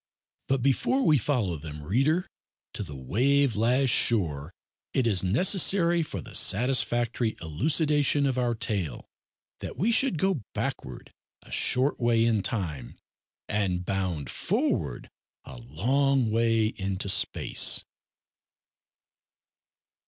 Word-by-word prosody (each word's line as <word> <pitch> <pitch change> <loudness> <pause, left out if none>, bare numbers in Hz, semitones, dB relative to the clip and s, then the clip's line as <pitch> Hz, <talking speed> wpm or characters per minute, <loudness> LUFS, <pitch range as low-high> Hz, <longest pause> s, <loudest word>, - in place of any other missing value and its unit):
But 135 -2 0
before 200 - +1
we 150 -3 +4
follow 110 - -1
them, 75 0 -9
reader, 135 - +1 0.5
to - - -6
the 75 - -7
wave 125 - +1
lashed 125 +4 +2
shore, 80 -9 +2 0.4
it 130 - +1
is 100 -6 +1
necessary, 170 - +3
for 100 - -5
the - - -12
satisfactory 120 0 0
elucidation 145 - +1
of 130 -2 -1
our 120 -1 0
tale, 100 - -4 0.5
that - - -8
we 220 +6 +1
should 235 -6 +2
go 190 -4 0
backward 65 - -5 0.3
a - - -17
short 130 +3 +1
way 115 -2 +2
in 110 -3 +1
time, 80 - -4 0.5
and 95 -4 -2
bound 95 -7 -3
forward 65 -5 -2 0.4
a 65 - -11
long 125 - 0
way 115 0 +2
into 100 -2 -4
space. 95 - +2
115 Hz, 115 wpm, -26 LUFS, 95-140 Hz, 0.5 s, we